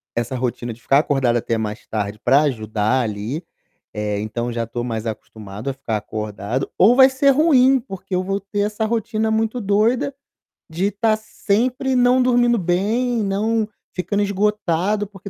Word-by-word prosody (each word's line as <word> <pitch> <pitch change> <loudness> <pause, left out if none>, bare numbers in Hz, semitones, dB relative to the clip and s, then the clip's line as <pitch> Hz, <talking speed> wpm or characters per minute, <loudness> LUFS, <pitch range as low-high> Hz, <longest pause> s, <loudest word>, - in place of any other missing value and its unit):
essa 120 +2 -2
rotina 120 -1 -3
de 120 - -18
ficar 135 +3 +4
acordado 135 -5 +1
até 115 0 -1
mais 105 -1 -4
tarde 105 -1 -3
para 135 +4 +5
ajudar 110 -2 0
ali, 110 - -4 0.5
eh, 105 -1 -2
então 120 +3 -3
já 115 0 -2
estou 115 +1 -5
mais 115 -2 -4
acostumado 110 +1 -6
a - - -2
ficar 130 -5 -3
acordado, 105 +3 -4
ou 235 +6 +5
vai 265 -1 +8
ser 270 +1 +3
ruim, 270 -3 +5
porque 195 -4 -7
eu 185 - -1
vou 195 +1 -2
ter 200 +1 -4
essa 210 +2 -1
rotina 220 0 -1
muito 225 +2 0
doida, 220 +6 +1 0.6
de 180 +5 0
tá 215 +2 +1
sempre 240 +5 -1
não 250 +1 +4
dormindo 240 -1 +3
bem, 215 +6 0
não 215 +3 0 0.3
ficando 205 +3 -1
esgotado, 205 -1 0
porque 200 -1 -11
195 Hz, 165 wpm, -20 LUFS, -, 0.6 s, vai